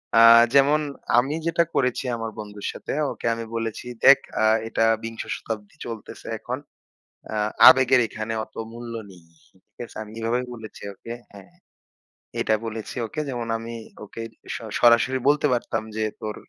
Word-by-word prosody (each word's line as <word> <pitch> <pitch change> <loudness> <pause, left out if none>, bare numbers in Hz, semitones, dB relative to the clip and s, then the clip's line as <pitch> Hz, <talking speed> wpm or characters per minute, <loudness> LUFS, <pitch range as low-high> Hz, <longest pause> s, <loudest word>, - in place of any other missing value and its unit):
আ - - +7 0.3
যেমন 140 +2 +5 0.4
আমি 135 +4 +3
যেটা 170 0 +3
করেছি 125 -1 +1
আমার 115 -1 -4
বন্ধুর 105 -1 -8
সাথে। - - -7 0.2
ওকে - - -8
আমি 115 0 -5
বলেছি 115 0 -3 0.2
দেখ 140 - +10 0.2
আ - - +3 0.2
এটা 115 - 0 0.2
বিংশ 115 0 -5
শতাব্দী 105 -2 -7
চলতেসে 115 -3 -8
এখন। - - -4 0.7
অ্যা 110 - -4 0.3
আবেগের 130 -1 +7
এখানে 110 +1 -5
অত 110 - -15 0.2
মূল্য 120 0 -8 0.2
নেই, 90 -2 -16 0.5
ঠিক 105 - -56
আছে? - - -17
আমি 105 - -13
এভাবেই 120 +3 0
বলেছি 110 -3 -10
ওকে 115 +4 -8 0.2
হ্যাঁ? 100 -2 -13 0.9
এটা 110 - +2
বলেছি 110 -1 -6
ওকে 155 +7 -4
যেমন 120 -3 -4
আমি 115 +1 -7 0.3
ওকে 105 +2 -8 0.3
সরা 115 -3 -7
সরাসরি 120 +2 +5
বলতে 150 +1 +4
পারতাম 120 -2 -1
যে 110 - -1 0.2
"তোর 105 -1 -4
115 Hz, 155 wpm, -24 LUFS, 110-125 Hz, 0.9 s, দেখ